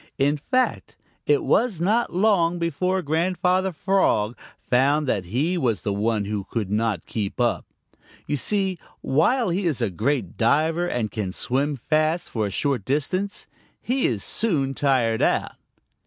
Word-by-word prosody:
In 145 +2 +2
fact, 255 - -1 0.3
it 425 -5 +3
was 230 - +1
not 215 +7 +1
long 180 -3 +2
before 180 +3 -1
Grandfather 180 +4 +1
Frog 155 - +1 0.2
found 140 +4 +2
that 100 -8 -1
he 145 - 0
was 115 - 0
the 105 -3 -1
one 105 0 0
who 100 -1 -4
could 105 -5 -3
not 105 -5 0
keep 105 -1 -4
up. 120 -1 0 0.6
You 150 - -1
see, 190 +3 0 0.2
while 185 - +2
he 180 +2 0
is 150 -7 -1
a 115 -5 0
great 115 - -1
diver 160 +8 +2
and 115 - -2
can 100 -4 -3
swim 140 +9 -1
fast 155 +6 0
for 110 -3 -1
a - - -3
short 135 +3 -1
distance, 185 - -2 0.3
he 255 +1 0
is 110 -5 -2
soon 150 -12 0
tired 125 -5 +1
out. - - 0
145 Hz, 155 wpm, -24 LUFS, 115-180 Hz, 0.6 s, it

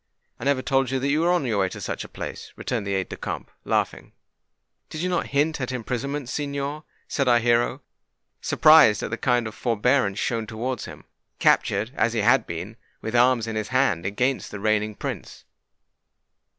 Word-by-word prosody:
"I 115 - -6
never 140 -2 +2
told 135 -2 +1
you 135 - 0
that 135 +2 -1
you 155 +2 +2
were 170 - +2
on 175 -6 +1
your 110 -5 0
way 95 -1 +2
to - - -8
such - - -4
a - - -11
place," - - -7
returned 110 -5 -3
the 100 - 0
aide 95 -1 -2
de - - -5
camp, - - -5
laughing. - - -1 0.8
"Did 155 - -5
you 180 - 0
not 175 -2 0
hint 145 +2 0
at 125 - -2
imprisonment, 130 +3 -3
signor?" 140 +2 -3 0.2
said 140 -2 -1
our 120 -1 +6
hero, 120 0 +1 0.6
surprised 155 -9 +6
at - - -4
the 110 - -2
kind 120 -2 +2
forbearance 120 -2 +1
shown 115 -1 -1
towards 120 +4 -4
him—captured, 105 +4 -1
as 115 - +1
he 115 - 0
had 120 +2 +4
been, 90 +7 -6 0.2
with 110 +2 -4
arms 120 -1 +4
in 110 -1 -4
his 110 -1 -2
hand 130 -9 +1
against 125 +6 -1
the 105 - -7
reigning 105 0 0
Prince. - - -6
120 Hz, 185 wpm, -24 LUFS, 110-140 Hz, 0.8 s, our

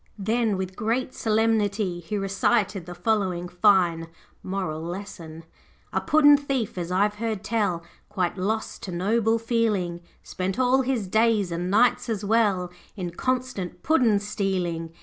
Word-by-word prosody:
Then, 220 0 0
with 190 0 -4
great 240 +4 -1
solemnity, 215 -4 +1
he 175 +5 -4
recited 195 -1 0
the 175 - -7
following 180 -2 0
fine 175 -3 +3 0.3
moral 185 -5 -3
lesson 170 -2 -7 0.5
'A - - +1
puddin' 290 -1 +6
thief, 275 -6 -2
as 175 -1 -4
I've 205 +3 +2
heard 220 -3 -2
tell, 205 -7 0 0.3
Quite 185 -4 -1
lost 215 +4 -2
to 190 - -6
noble 220 +6 +1
feeling, 220 -7 0 0.2
Spent 185 +1 -3
all 260 +1 +3
his 250 -6 -1
days, 220 -2 +2
and 175 +2 -2
nights 235 +4 +3
as 210 -2 -2
well, 200 -5 +2 0.2
In 180 -4 -4
constant 245 -5 -3
puddin' 245 -10 +3
stealing. 185 -5 -2
200 Hz, 140 wpm, -25 LUFS, 180-225 Hz, 0.5 s, puddin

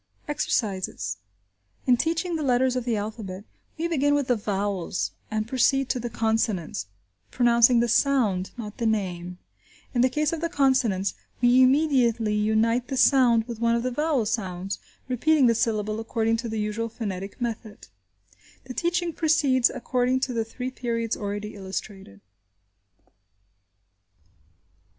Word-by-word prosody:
Exercises. 190 - -2 0.7
In 250 - +5
teaching 330 +5 -1
the 315 - -2
letters 255 -2 +2
of 250 -2 -2
the 235 -3 0
alphabet, 205 -2 -5 0.3
we 330 +2 -1
begin 290 -3 +2
with 285 -2 -1
the 245 - +4
vowels 195 - -2 0.2
and 215 0 -2
proceed 265 +2 +2
to 250 - 0
the 240 0 -4
consonants, 220 - -1 0.4
pronouncing 235 -1 +4
the 240 - +1
sound, 230 -7 +2
not 210 -3 -7
the 230 - +1
name. 180 -5 -2 0.6
In 240 - +2
the 255 - +4
case 300 +4 0
of 325 - -3
the 335 - -1
consonants, 255 - +1 0.3
we 245 +1 +5
immediately 255 -5 +3
unite 220 +3 +1
the 265 - -3
sound 245 -4 +4
with 235 -2 -6
one 235 0 +2
of 235 - -1
the 255 - -1
vowel 295 -3 0
sounds, 195 -3 -3 0.3
repeating 270 +3 +3
the 235 - +5
syllable 215 -1 -1
according 225 0 0
to 230 0 -4
the 220 0 -3
usual 215 +2 -2
phonetic 200 -4 -6
method. 225 -3 -5 0.8
The 255 - -8
teaching 345 +2 -1
proceeds 290 -6 +3
according 255 0 0
to 260 - -1
the 230 -1 0
three 250 +3 -6
periods 230 -3 -2
already 205 +1 -5
illustrated. 190 - -7
235 Hz, 145 wpm, -25 LUFS, 210-260 Hz, 0.8 s, In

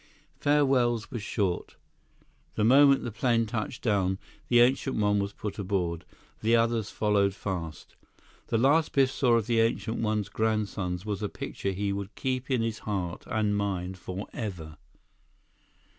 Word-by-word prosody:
Farewells 135 -6 +2
were 120 - -3
short. 100 -3 -2 0.8
The 105 - +1
moment 140 +4 +6
the 120 - -4
plane 115 +1 +1
touched 110 +2 -4
down, 95 -4 +1 0.3
the 120 - +5
Ancient 130 +2 +3
One 105 -1 +2
was 100 0 -2
put 105 +1 -6
aboard. 90 -4 -2 0.4
The 115 +2 +3
others 115 -2 +1
followed 100 -2 +1
fast. 85 -6 -5 0.5
The 115 - +1
last 145 +7 +3
Biff 135 -2 +4
saw 125 -4 +3
of 115 -3 +1
the 115 0 +1
Ancient 115 0 0
One's 105 -2 -1
grandsons 100 -4 -1
was 105 -2 -3
a 105 - -1
picture 100 - -4
he 100 +1 -1
would 100 +1 -5
keep 130 0 -2
in 125 -4 +1
his 115 -1 -2
heart 95 -5 -4
and 105 -2 0
mind 95 -2 -2
forever. 90 -4 -6
105 Hz, 150 wpm, -28 LUFS, 100-120 Hz, 0.8 s, moment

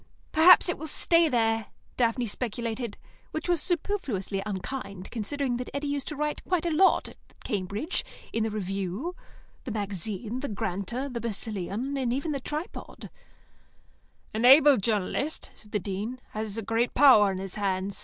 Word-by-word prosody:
"H'm. - - -32 0.2
Perhaps 335 +5 +8
it 350 - -1
will 315 - -5
stay 335 +1 +4
there," 225 -3 +1 0.3
Daphne 240 0 +1
speculated, 230 0 -4 0.3
which 315 - -4
was 350 -3 +2
superfluously 280 - -1
unkind, 200 -1 -5
considering 245 +3 -2
that 250 - -5
Eddy 280 +1 -2
used 285 -1 -2
to 300 - -3
write 300 +1 -2
quite 360 -2 0
a 340 - +1
lot 380 +5 +4
at - - -16 0.3
Cambridge, 205 - -2 0.3
in 225 - 0
the 220 - +1
Review, 200 - -3 0.5
the - - -6
Magazine, 205 +2 -3
the 285 - -3
Granta, 200 +6 -3
the 245 -4 -5
Basileon, 220 +3 -2
and 250 -3 0
even 280 +5 -1
the 280 - -2
Tripod. 300 +5 -6 1.2
"An 220 +2 -1
able 280 +2 +8
journalist," 220 +8 -1
said 210 - -17
the - - +1
Dean, 205 +6 -4
"has 215 -1 -4
a 225 - -3
great 230 +3 0
power 245 -8 +7
in 190 - -4
his 190 0 -3
hands. 195 -1 -1
230 Hz, 165 wpm, -27 LUFS, 205-280 Hz, 1.2 s, Perhaps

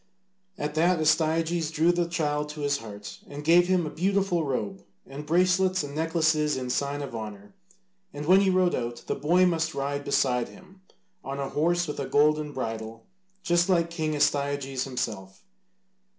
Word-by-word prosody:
At 150 0 -3
that 170 +2 +2
Astyages 160 +1 +1
drew 160 +2 +3
the 175 -1 0
child 150 -3 -1
to 150 0 -7
his 140 -1 0
heart, 105 -2 -9
and 145 +1 -8
gave 175 +3 +5
him 180 -2 +2
a 150 - -5
beautiful 190 0 0
robe 175 +7 -3 0.2
and 145 +2 -9
bracelets 185 +1 +2
and 140 -1 -7
necklaces 155 -2 +1
in 125 -1 -3
sign 140 +2 -1
of 130 -4 -7
honour, 105 - -8 0.6
and 145 -2 -6
when 185 +4 +6
he 195 - +3
rode 185 -1 +2
out, 120 -1 -4
the - - -1
boy 175 +5 +3
must 165 -2 0
ride 140 +1 -2
beside 125 -4 +1
him 190 0 -17 0.4
on 135 +1 -5
a 135 -1 -3
horse 175 +3 +1
with 150 - -5
a 135 - -3
golden 150 0 +2
bridle, 115 -3 -5 0.4
just 175 0 +2
like 170 -2 +2
King 155 -2 -2
Astyages 140 -2 0
himself. 95 -7 -5
150 Hz, 170 wpm, -27 LUFS, 140-175 Hz, 0.6 s, when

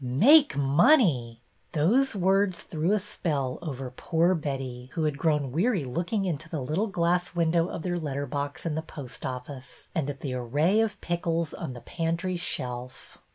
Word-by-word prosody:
Make 220 - +5
money! 140 - +3
" - - -41
Those 225 - +3
words 190 0 +2
threw 160 +3 -1
a 210 - +4
spell 150 -10 -2
over 135 -6 -5
poor 165 +7 +1
Betty, 135 -6 -4
who 165 - -1
had 150 -2 +1
grown 150 -5 +1
weary 185 - +1
looking 175 - -1
into 165 -2 -3
the 160 - -3
little 155 - -1
glass 175 -2 0
window 170 0 +2
of 165 - -6
their 175 -1 -1
letter 145 -3 -3
box 145 +1 -4
in 165 - -1
the 160 - -1
post 140 -5 -7
office 130 +1 -8
and 155 -5 -1
at 140 -1 -6
the 135 -3 -3
array 145 - +2
of 225 -1 -1
pickles 170 -2 -1
on 130 - -5
the 120 - -9
pantry 170 +2 -2
shelf. 125 -7 -5
160 Hz, 175 wpm, -27 LUFS, 135-180 Hz, -, Make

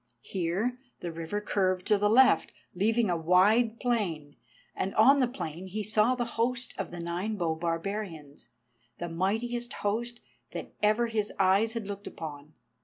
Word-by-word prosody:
Here 195 +8 -2 0.2
the 170 - -4
river 165 +5 -3
curved 185 -3 0
to 210 - +3
the 205 0 +3
left, 255 +4 +5 0.2
leaving 220 +2 +2
a - - +2
wide 205 +8 +3
plain, 175 - -1 0.4
and 195 - -2
on 270 +6 +6
the 255 - +3
plain 180 - -6
he 210 +3 -3
saw 215 +4 +3
the 245 -1 -1 0.2
host 250 +1 0
of 195 - -3
the 175 - -8
Nine 175 +6 -2
bow 170 -5 0
barbarians, 165 -2 -4 0.5
the 175 - -4
mightiest 225 +8 -1
host 235 +3 -1 0.3
that - - -6
ever 215 +3 +3
his 220 -3 -1
eyes 195 +4 +3
had 230 -3 -4
looked 200 0 -6
upon. 150 -1 -8
205 Hz, 160 wpm, -29 LUFS, 175-230 Hz, 0.5 s, on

